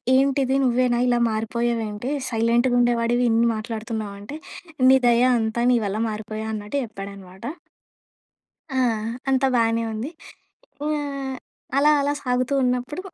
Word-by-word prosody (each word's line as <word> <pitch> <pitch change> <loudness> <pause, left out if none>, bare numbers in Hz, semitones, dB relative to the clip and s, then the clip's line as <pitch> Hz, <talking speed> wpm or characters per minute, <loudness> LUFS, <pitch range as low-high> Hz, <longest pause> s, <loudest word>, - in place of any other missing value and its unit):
ఏంటిది 270 0 +2
నువ్వేనా? 245 -1 +2
ఇలా 240 -1 +2
మారిపోయావు 230 +1 -1
ఏంటి? 210 +6 -4 0.2
సైలెంట్‌గా 235 +2 +2
ఉండేవాడివి. 240 0 +2
ఇన్ని 230 +1 +3
మాట్లాడుతున్నావు" 220 -2 -5
అంటే 270 +9 -7 0.5
"నీ 265 - +7
దయ 240 0 +4 0.2
అంతా. 225 +1 -1
నీ 245 - +4
వల్ల 205 +2 -2
మారిపోయా" 215 0 -5
అన్నట్టు 210 +5 -4
చెప్పాడనమాట. 195 -3 -10 1.3
ఆ! - - -1 0.5
అంతా 270 0 +3
బానే 230 0 +2
ఉంది. 220 +7 -4 0.8
ఇ - - 0
ఆహ్, 275 -2 -4 0.4
అలా, 295 +2 +5
అలా 285 +1 +1
సాగుతూ 255 +1 0
ఉన్నప్పుడు 250 +7 -1
235 Hz, 130 wpm, -23 LUFS, 220-255 Hz, 1.3 s, నీ